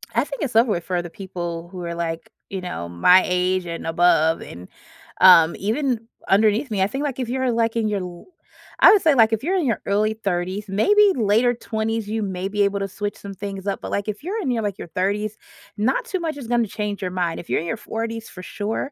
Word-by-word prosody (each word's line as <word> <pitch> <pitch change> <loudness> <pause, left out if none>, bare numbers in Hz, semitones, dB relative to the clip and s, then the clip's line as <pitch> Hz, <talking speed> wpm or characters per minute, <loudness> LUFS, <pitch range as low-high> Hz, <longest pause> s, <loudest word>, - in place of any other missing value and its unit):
I 235 - +3
think 280 -1 -7
it's 250 -6 -3
over 230 0 +5
with 170 -4 -1
for 180 0 -1
the 175 - -8
people 175 -2 -6
who 180 -2 -7
are, 170 0 -4
like, 165 -1 -4 0.2
you 190 -1 -4
know, 130 - -5
my 180 - +5
age 180 0 0
and 170 -1 -6
above, 165 -1 +3
and, 90 +2 -10 0.5
um, 170 -3 +8
even 230 +2 -1 0.2
underneath 215 +5 +3
me. 200 - 0
I 190 - +3
think, 270 +7 -4
like, 275 -3 -3
if 250 -2 -3
you're, 260 0 0
like, 230 -1 0
in 225 -2 +1
your 205 -2 -1
l 175 -1 -8 0.6
I - - +10
would 415 - +4
say, 315 -4 +4
like, 225 -4 +4
if 225 - -1
you're 370 +5 +1
in 345 - 0
your 230 -5 0
early 210 +2 +1
30s, 195 -1 -3
maybe 410 - +4
later 230 +2 +3
20s, 225 -1 -3
you 220 0 -1
may 190 -1 -3
be 205 +1 -1
able 200 0 0
to 195 - -2
switch 205 +2 -5
some 200 -1 -8
things 195 0 -6
up, 200 - -2
but, - - -6
like, 200 +1 -2
if 210 +3 -5
you're 410 +6 -3
in 310 - -2
your, 230 -2 -1
like, 200 -2 -3
your - - -8
30s, 205 +4 -1 0.4
not 225 +6 0
too 375 - -3
much 320 -3 -3
is 265 -5 -8
gonna 235 -1 +2
change 205 0 -4
your 185 -1 -3
mind. 175 -2 -2
If - - -19
you're - - +1
in 170 - -6
your 225 - -1
40s 225 +1 -5
for 180 - -10
sure 215 +8 -4
205 Hz, 245 wpm, -22 LUFS, 180-230 Hz, 0.6 s, I